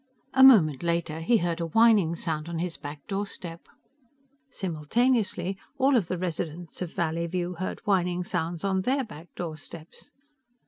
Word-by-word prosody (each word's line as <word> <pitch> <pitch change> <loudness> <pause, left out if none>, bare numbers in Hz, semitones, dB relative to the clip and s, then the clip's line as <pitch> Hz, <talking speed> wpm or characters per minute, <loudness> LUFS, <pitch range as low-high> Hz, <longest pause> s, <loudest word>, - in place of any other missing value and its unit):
A 265 0 +6
moment 175 - +7
later 170 -2 -1
he 230 +8 +4
heard 175 -3 -1
a 165 - -1
whining 205 -3 +4
sound 160 -1 -3
on 170 - -3
his 170 0 -2
back 145 0 -9
doorstep. 195 -4 -5 0.8
Simultaneously 190 - 0 0.2
all 270 +1 +4
of 210 -9 +2
the 185 - -2
residents 170 -1 -4
of 175 -3 -3
Valleyview 170 +1 -2
heard 185 - -4
whining 180 -3 +1
sounds 175 -2 -3
on 190 -1 +1
their 265 +6 +1
back 175 -8 -11
doorsteps. 160 - -8
175 Hz, 145 wpm, -27 LUFS, 165-195 Hz, 0.8 s, moment